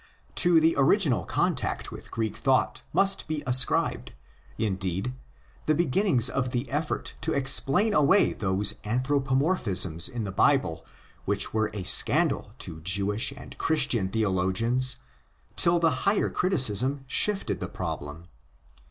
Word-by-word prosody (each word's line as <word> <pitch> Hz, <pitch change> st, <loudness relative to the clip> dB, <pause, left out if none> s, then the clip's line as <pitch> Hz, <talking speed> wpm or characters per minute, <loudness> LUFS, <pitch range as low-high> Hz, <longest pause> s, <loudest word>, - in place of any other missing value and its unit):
To 175 Hz, -2 st, +4 dB
the 160 Hz, +1 st, +3 dB
original 135 Hz, -, +3 dB
contact -, -, -2 dB
with -, -, -11 dB
Greek 110 Hz, -2 st, -3 dB
thought 130 Hz, -1 st, 0 dB
must 195 Hz, 0 st, +2 dB
be 155 Hz, -1 st, -3 dB
ascribed, 125 Hz, 0 st, +1 dB, 0.4 s
indeed, 95 Hz, +2 st, -2 dB, 0.5 s
the 155 Hz, -, +3 dB
beginnings 165 Hz, -, +2 dB
of 130 Hz, -1 st, -1 dB
the 125 Hz, +1 st, -3 dB
effort 150 Hz, +2 st, -3 dB
to 160 Hz, -, -1 dB
explain 140 Hz, +9 st, +3 dB
away 150 Hz, +7 st, +3 dB
those 100 Hz, +1 st, 0 dB
anthropomorphisms 130 Hz, -, 0 dB
in 120 Hz, -2 st, -5 dB
the 100 Hz, -, -5 dB
Bible 95 Hz, -, +1 dB, 0.4 s
which 100 Hz, 0 st, 0 dB
were 110 Hz, -1 st, 0 dB
a 100 Hz, -3 st, -6 dB
scandal 145 Hz, -, +1 dB
to 80 Hz, -8 st, -9 dB
Jewish 100 Hz, -, 0 dB
and 140 Hz, -, -12 dB
Christian 135 Hz, -11 st, +1 dB
theologians 110 Hz, +5 st, +1 dB, 0.6 s
till 170 Hz, 0 st, +2 dB
the 165 Hz, -1 st, +2 dB, 0.2 s
higher 200 Hz, -, 0 dB
criticism 135 Hz, -, +1 dB
shifted 200 Hz, +9 st, 0 dB
the -, -, -5 dB
problem. 75 Hz, +3 st, -6 dB
130 Hz, 125 wpm, -26 LUFS, 100-155 Hz, 0.6 s, To